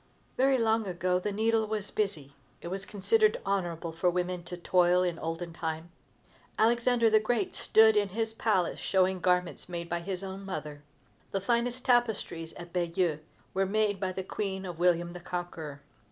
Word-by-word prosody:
Very 265 +1 +4
long 225 -2 +2
ago 180 0 0
the 205 +3 -2
needle 220 +1 +1
was 210 -1 -3
busy. 160 -10 -2 0.3
It 170 - -7
was 195 +1 -5
considered 435 - +2
honorable 175 -4 -1
for 165 +2 +1
women 180 0 -2
to 180 - -6
toil 180 0 +3
in 175 -2 -1
olden 165 +1 -4
time. 160 0 -4 0.7
Alexander 235 +1 +3
the 215 - +6
Great 215 -2 0
stood 220 0 +5
in 205 -1 +2
his 225 +3 -2
palace 210 -6 +1
showing 190 -1 +2
garments 180 0 0
made 170 -1 -5
by 175 - -1
his 185 +2 -4
own 195 +1 -6
mother. 150 -6 -6 0.5
The 195 - -1
finest 240 +4 0
tapestries 220 -9 +1
at 175 0 -10
Bayeux 170 -3 0 0.3
were 195 0 +1
made 210 -1 +1
by 190 -1 -1
the 190 +1 -4
Queen 190 0 -3
of 175 -2 -6
William 175 -1 +2
the 180 - -7
Conqueror. 165 -5 -6
185 Hz, 170 wpm, -30 LUFS, 175-215 Hz, 0.7 s, the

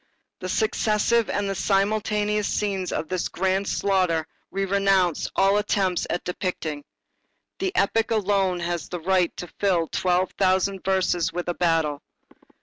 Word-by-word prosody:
The 185 - -5
successive 220 +2 +1
and 200 -1 -1
simultaneous 210 +1 +1
scenes 195 -3 -1
of 160 - -2
this 185 +1 -1
grand 190 +1 0
slaughter 185 -5 +1 0.2
we 195 0 -1
renounce 195 -3 +2
all 195 +1 +4
attempts 190 -4 0
at 175 - -2
depicting. 165 -5 -3 0.8
The 380 -1 -1
epic 225 +3 +2
alone 195 -4 +1
has 170 -2 -3
the 175 - -4
right 180 0 +2
to - - -5
fill 185 -5 +2
twelve 180 0 +1
thousand 190 0 +1
verses 185 -3 +1
with 175 0 -4
a - - 0
battle. 165 -4 +1
190 Hz, 140 wpm, -24 LUFS, 175-200 Hz, 0.8 s, all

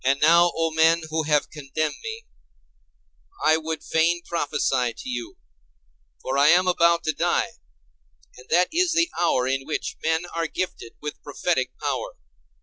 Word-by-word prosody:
And 135 +2 +2
now, 170 +3 +5
O 165 0 0
men 160 +1 +3
who 160 0 -1
have 150 -1 +2
condemned 150 +1 -3
me, 445 +1 -6 1.2
I 155 - +5
would 160 0 -5
fain 170 +2 +1
prophesy 135 -7 -1
to - - -10
you; 120 -2 -5 0.9
for 135 +1 -1
I 145 - +5
am 180 +3 +5
about 170 -1 +3
to 155 - 0
die, - - 0 0.8
and 125 +1 -15
that 180 +2 +3
is 350 0 +2
the 335 0 +2
hour 130 -7 +2
in 135 +1 -1
which 155 - -3
men 160 +2 +1
are 165 -1 -3
gifted 155 -8 -5
with 150 - -6
prophetic - - -2
power. - - -3
160 Hz, 155 wpm, -24 LUFS, 145-175 Hz, 1.2 s, now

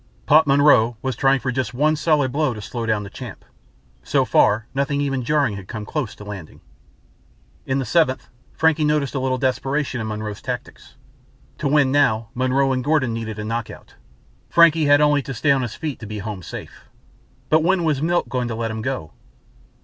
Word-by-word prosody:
Pop 155 +1 +5
Monroe 135 -5 +4
was 130 -1 -2
trying 135 0 +3
for 130 - -1
just 125 -1 -3
one 155 +4 +2
solid 150 -4 +1
blow 145 -4 0
to - - -7
slow 115 +3 -5
down 110 -2 0
the 100 - -8
Champ. 120 -4 -9 0.6
So - - +1
far 110 +2 +3
nothing 140 +1 -1
even 135 -3 -1
jarring 140 -6 +1
had 95 -2 -10
come 110 -2 -6
close 145 -5 -4
to - - -11
landing. 100 -6 -9 1.1
In 130 - 0
the 135 - -1
seventh 135 -6 +1 0.3
Frankie 160 -1 +2
noticed 150 -4 +1
a 135 - -1
little 130 0 0
desperation 130 +1 -1
in 110 - -4
Monroe's 105 -1 -5
tactics. - - -7 0.6
To 150 - -1
win 140 -2 +3
now 115 -6 +2
Monroe 130 +1 +1
and 130 -1 -2
Gordon 145 -5 +1
needed 110 -2 -5
a 105 - -4
knockout. 115 +1 -5 0.6
Frankie 165 -2 +5
had 145 0 +5
only 150 -1 +3
to 135 0 -7
stay 140 +5 +2
on 135 -1 +3
his 120 -4 -4
feet 155 -4 -5
to 110 - -8
be 105 +1 -6
home 105 -2 -5
safe. - - -10 0.6
But 155 +1 +4
when 175 +2 +2
was 150 -4 0
Milt 175 +2 +1
going 125 -2 -2
to 115 - -4
let 115 0 -3
him 110 0 -4
go? 125 - -4
130 Hz, 195 wpm, -21 LUFS, 115-145 Hz, 1.1 s, Pop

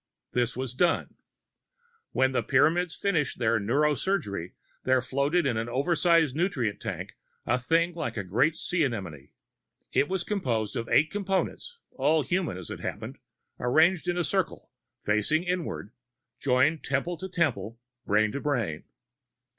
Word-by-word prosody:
This 125 0 0
was 130 -1 -3
done. 170 +6 +1 1.0
When 130 0 +2
the 130 - +1
Pyramids 165 +6 +2
finished 165 -8 0
their 115 -1 +2
neuro 140 +9 +2
surgery, 105 - -2 0.3
there 130 0 +3
floated 140 +6 +1
in 120 -5 +1
an 115 +1 -2
oversized 160 +2 +2
nutrient 150 - -1
tank - - -5 0.3
a 120 +2 +1
thing 165 +7 +2
like 120 -9 -4
a 100 - -1
great 125 - +2
sea 175 0 0
anemone. 90 - -4 0.6
It 145 - +2
was 190 -2 -1
composed 120 - -1
of 115 0 -3
eight 155 +2 +4
Components 205 - -2
all 155 -1 +2
human, 175 - -1
as 95 - -8
it - - -6
happened - - -6 0.4
arranged 160 +8 +3
in 175 0 0
a 175 - +1
circle, 190 +1 -2 0.3
facing 105 - +1
inward, 180 -2 -3 0.5
joined 140 +4 +2
temple 140 +6 -1
to 190 +4 -6
temple, 120 - -1 0.3
brain 105 +1 +3
to 140 - -4
brain. 115 - -1
140 Hz, 145 wpm, -28 LUFS, 115-170 Hz, 1.0 s, eight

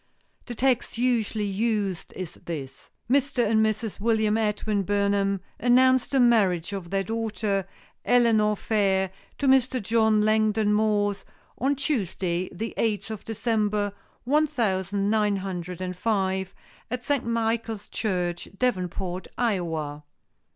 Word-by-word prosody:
The 240 - -5
text 255 -1 +1
usually 230 -3 +1
used 200 -2 -1
is 180 -3 -6
this: 135 -6 -8 0.2
"Mr. 265 -1 +2
and 220 0 +3
Mrs. 220 0 -1
William 220 -1 +2
Edwin 210 -1 0
Burnham 200 0 +1 0.2
announce 255 +1 +4
the 270 - +1
marriage 205 -7 +3
of 190 -4 -5
their 195 +1 0
daughter, 210 -2 -2 0.4
Eleanor 225 -4 +4
Fair, 195 -4 +1 0.3
to 280 - 0
Mr. 260 -1 +4
John 220 0 +3
Langdon 215 -1 +2
Morse, 205 -2 +1 0.4
on 275 +4 +2
Tuesday, 185 - -1
the 225 +5 -5
eighth 220 -1 -1
of 215 - -6
December, 210 -2 0 0.3
one 300 +5 +3
thousand 200 -6 0
nine 210 -2 +2
hundred 180 -2 -5
and 180 0 -3
five, 190 -2 -1 0.3
at 250 +1 -3
St. 285 -1 0
Michael's 225 -2 -1
Church, 180 -5 -2
Davenport, 185 -5 -2
Iowa." 165 -10 -1
210 Hz, 125 wpm, -26 LUFS, 190-230 Hz, 0.4 s, announce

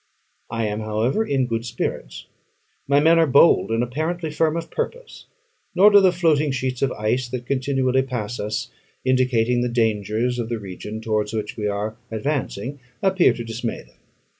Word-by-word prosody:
I 115 -1 -2
am, 105 0 -2
however, 110 - 0
in 135 -10 0
good 115 -1 -2
spirits: 110 - -4 0.6
my 140 +1 +4
men 165 +3 +5
are 165 - +4
bold, 140 +1 +5
and 115 +1 +1
apparently 160 +6 -3
firm 160 +1 +1
of 165 - -6
purpose; 485 +1 -5 0.5
nor 205 +3 +7
do 205 - +8
the 190 -2 +5
floating 160 -4 +2
sheets 130 -1 -2
of 135 -2 +2
ice 120 +4 -1
that 125 0 -5
continually 130 0 +1
pass 120 -3 -4
us, 105 +1 -3 0.3
indicating 125 -2 +2
the 125 - 0
dangers 115 +1 0
of 115 -1 -3
the 120 - -2
region 105 +2 -7
towards 110 -1 -1
which 105 -1 -3
we 105 -1 -2
are 105 +2 -3
advancing, 130 +1 -3 0.2
appear 190 -2 +4
to 120 - -6
dismay 115 +1 -4
them. - - -26
125 Hz, 170 wpm, -22 LUFS, 110-145 Hz, 0.6 s, do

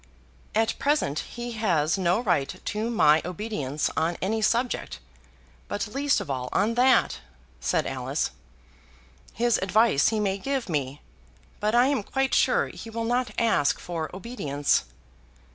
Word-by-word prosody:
"At 225 0 +1
present 280 - +1
he 240 0 -6
has 175 -9 +1
no 185 +1 +1
right 175 - 0
to 215 +2 -2
my 155 -9 +4
obedience 165 -6 -3
on 165 +2 0
any 220 +4 -1
subject, 235 +3 0 0.7
but 205 +1 -3
least 285 +1 +2
of - - -6
all 130 -2 -3
on 220 +3 +1
that," 250 +2 +3 0.4
said - - 0
Alice. - - -2 1.0
"His 235 +1 +1
advice 200 -5 +3
he 220 - +1
may 200 -1 0
give 270 +3 -2
me, 145 -4 -3 0.6
but 215 +2 +1
I 245 +1 +6
am 275 -3 +1
quite 270 +6 -1
sure - - +3
he 230 - -9
will 230 +1 -3
not 245 +2 0
ask 220 -11 +2
for 165 -3 -4
obedience." 150 - -1
215 Hz, 145 wpm, -26 LUFS, 160-240 Hz, 1.0 s, I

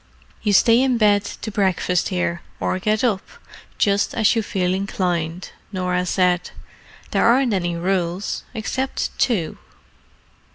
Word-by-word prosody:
"You 210 - +1
stay 230 +5 +5
in 260 -2 +2
bed 205 -2 +4
to 220 - -6
breakfast 185 -3 +1
here, 175 -2 -1 0.2
or 185 - -1
get 215 +4 0
up, 210 -6 +2 0.6
just 200 -1 +1
as 225 +1 +3
you 225 - +2
feel 185 -3 -1
inclined," 180 -3 -2 0.2
Norah 180 -1 -1
said. 180 -1 +1 0.6
"There - - +2
aren't 245 0 +4
any 175 -3 -1
rules 180 +1 -1
except 260 +4 -2
two." 195 -11 0
195 Hz, 130 wpm, -21 LUFS, 180-215 Hz, 0.6 s, stay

